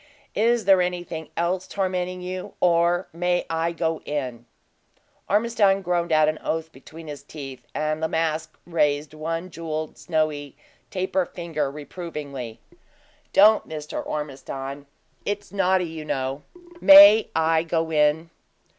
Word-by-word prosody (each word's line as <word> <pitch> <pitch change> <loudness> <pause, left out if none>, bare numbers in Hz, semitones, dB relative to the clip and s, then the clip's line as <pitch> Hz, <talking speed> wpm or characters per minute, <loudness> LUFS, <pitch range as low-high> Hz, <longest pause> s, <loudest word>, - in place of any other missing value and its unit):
Is 230 0 +2
there 190 -1 +6
anything 175 -3 -3
else 180 +2 -1
tormenting 185 -2 -2
you, 185 0 -6
or 175 +1 +2
may 175 +1 0
I 165 +1 0
go 165 -1 -1
in?" 125 -5 -4 0.8
Ormiston 205 -2 +3
groaned 175 -1 0
out 155 -1 +5
an 155 0 -1
oath 160 0 -3
between 160 +5 -13
his 145 -3 -7
teeth, 140 -3 -10
and 155 +1 -1
La 160 - +1
Masque 160 -1 -2
raised 150 -3 0
one 165 +3 -4
jeweled, 155 -1 -5
snowy 155 -4 -2 0.3
taper 185 -1 -1
finger, 160 -5 -3
reprovingly. 145 -5 -7 0.7
"Don't 210 +2 +5
Mr. 150 -1 -5
Ormiston 140 -1 -6 0.4
it's 205 0 -4
naughty, 190 -2 +2
you 160 -2 -7
know! 135 -1 -3 0.4
May 290 -6 +9
I 160 0 +3
go 165 0 -1
in?" 155 +2 +2
165 Hz, 130 wpm, -24 LUFS, 150-180 Hz, 0.8 s, May